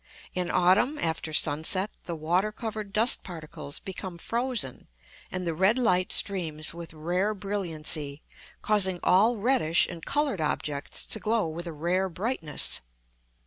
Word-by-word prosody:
In 180 -1 -1
autumn, 185 +11 +3
after 160 - -1
sunset, 160 +7 +3
the 170 - -4
water 175 +7 +1
covered 215 -2 -5
dust 225 +5 +3
particles 155 -5 -7
become 185 -2 -7
frozen 235 - -2 0.4
and 185 0 -3
the 165 - -1
red 190 +8 +3
light 185 -7 +2
streams 160 -6 +2
with 170 -1 -8
rare 180 +7 -1
brilliancy, 160 -7 -2 0.4
causing 190 -4 +2
all 215 +6 +4
reddish 210 -7 +3
and 170 -2 -8
coloured 285 - 0
objects 150 -1 -2
to 220 - -1
glow 220 -3 +1
with 170 +2 -6
a - - -4
rare 175 +5 0
brightness. 180 - -1
180 Hz, 140 wpm, -27 LUFS, 160-210 Hz, 0.4 s, all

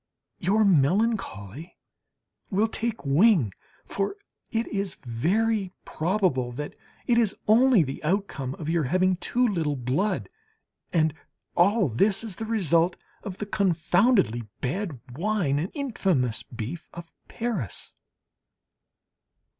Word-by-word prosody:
Your 205 +4 +3
melancholy 170 - +1 0.7
will 210 +2 +2
take 225 -2 -3
wing, 145 - +4 0.3
for 200 - -2 0.4
it 230 0 0
is 200 -3 -3
very 190 - 0
probable 160 -8 0
that 145 +4 -5 0.3
it 235 -1 +3
is 220 -4 +1
only 230 -2 +6
the 135 -2 -6
outcome 150 -7 -1
of 155 - -7
your 165 -2 +1
having 185 +6 +2
too 245 +6 +1
little 165 -8 0
blood. 145 - -1 0.6
And 160 -3 +2 0.4
all 200 +3 +4
this 195 - +1
is 215 -6 -6
the 225 - -4
result 175 -5 +2 0.3
of 195 -2 -7
the 210 - -4
confoundedly 180 - +2
bad 150 - -3 0.2
wine 175 -5 0
and 170 +5 -2
infamous 190 - 0
beef 120 +8 -7
of 170 -1 -9 0.2
Paris. 210 - -4
185 Hz, 115 wpm, -26 LUFS, 145-215 Hz, 0.7 s, only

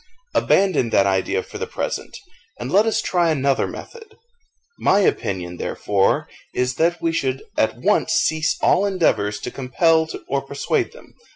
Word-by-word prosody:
Abandon 185 -11 +2
that 100 - +3
idea 100 - 0
for - - -9
the - - -3
present, - - -4 0.4
and - - -5
let 205 +4 +4
us 220 0 +1
try 175 -2 +1
another 140 -3 +1
method. 445 -2 -11 0.6
My 200 - +3
opinion, 90 - -1
therefore, 100 +2 0 0.3
is, 125 0 0
that 170 +2 +1
we 165 - +2
should 135 -5 -2
at - - +1
once - - +1
cease 155 -1 +1
all 195 - +4
endeavours 110 - +1
to 125 - -5
compel 160 +5 +2 0.2
or 140 0 0
persuade 140 +1 -1
them. - - -16
155 Hz, 155 wpm, -21 LUFS, 125-185 Hz, 0.6 s, let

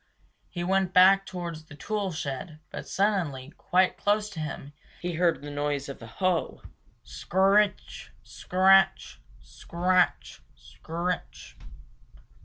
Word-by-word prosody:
He 175 - -5
went 190 0 0
back 195 +2 +6
towards 170 -3 -6
the 150 - -13
tool 200 +4 -3
shed, 155 0 -5
but - - -7
suddenly, 165 -10 -1
quite 185 +1 +1
close 210 0 0
to 170 - -8
him, 145 -2 -6 0.3
he 175 0 -4
heard 170 -2 +1
the 145 - -7
noise 145 -1 -2
of 140 - -9
a 115 - -9
hoe 185 - -2 0.4
scr 185 - -9
r 190 +1 +5
ritch, 210 0 0
scratch, 190 +1 +2 0.2
scratch, 180 +1 -1
scritch. 175 +2 -6
180 Hz, 125 wpm, -27 LUFS, 155-190 Hz, 0.4 s, back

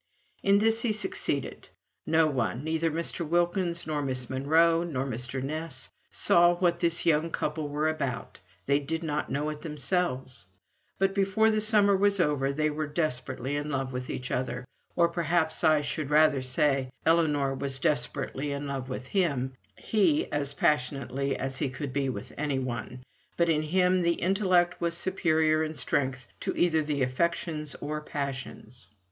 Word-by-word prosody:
In 200 0 +4
this 225 +2 +3
he 235 -3 +1
succeeded. 215 - 0 0.4
No 160 0 +4
one, 130 -3 -1
neither 160 +1 0
Mr. 165 +2 -3
Wilkins, 175 +1 0
nor 150 -1 -2
Miss 130 -3 -3
Monro, 160 +5 +3
nor 145 -6 -2
Mr. 125 +1 -4
Ness, 155 -2 -4 0.2
saw 175 0 +5
what 175 -1 +1
this 170 -1 +2
young 160 0 +2
couple 150 -1 -2
were 150 +2 0
about 140 -6 -3 0.3
they 140 +1 +3
did 160 +3 -4
not 150 -2 -2
know 145 +2 -1
it 150 - -8
themselves; 135 - -2 0.5
but 195 0 +1
before 200 +3 +2
the 215 0 +1
summer 210 -2 +4
was 200 0 +2
over 145 -4 +1
they 155 +2 0
were 155 0 -3
desperately 130 -3 -2
in 145 +1 -3
love 135 -2 -2
with 125 0 -5
each 125 - -5
other, 125 0 -2 0.3
or 170 -1 +4
perhaps 170 -1 0
I 155 -2 +4
should 145 0 -3
rather 150 -2 +4
say, 130 +1 +1 0.2
Ellinor 150 -4 +2
was 135 0 -1
desperately 135 +1 -1
in 140 +1 -4
love 135 -2 -4
with 130 0 -5
him 140 -7 0 0.2
he, 185 -9 +1
as 145 -1 -2
passionately 140 -1 0
as 135 0 -3
he 145 -2 -1
could 130 +1 -6
be 140 -1 0
with 100 -5 -6
anyone; 130 -4 -3 0.3
but 170 -1 +2
in 155 -2 +2
him 180 +3 +2
the 170 0 +2
intellect 185 -2 +1
was 170 0 +2
superior 160 -4 +2
in 155 0 -4
strength 130 -3 -1
to - - -3
either 160 -3 +3 0.2
affections 150 +2 -1
or 150 +1 -3
passions. 130 -6 -6
150 Hz, 160 wpm, -28 LUFS, 135-170 Hz, 0.5 s, saw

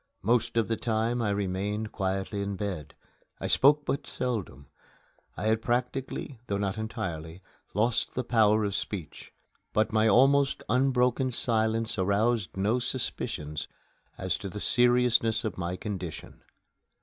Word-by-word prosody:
Most 115 +2 +1
of 115 - +3
the 115 - 0
time 115 +1 0
I 110 - +1
remained 100 +2 -2
quietly 95 +1 -2
in 100 0 -2
bed. 90 -7 -5 0.4
I - - -4
spoke 145 +2 +4
but 140 +1 -2
seldom. 105 - -3 0.7
I - - -4
had 110 +1 +2
practically, 125 +2 -2
though 100 - -1
not 100 +1 -2
entirely, 85 -6 -5 0.4
lost 110 +3 +1
the 125 - 0
power 110 -2 +4
of 100 -1 -1
speech; 95 -5 -5 0.4
but 110 0 +1
my 110 0 +4
almost 135 +5 +4
unbroken 130 0 +2
silence 115 -1 0
aroused 100 +2 +1
no 105 +6 +2
suspicions 75 - -3 0.5
as 95 0 -2
to 100 -1 -5
the 105 - -6
seriousness 120 -1 +3
of 110 - -2
my 85 0 -2
condition. 90 -4 -6
110 Hz, 135 wpm, -28 LUFS, 100-120 Hz, 0.7 s, spoke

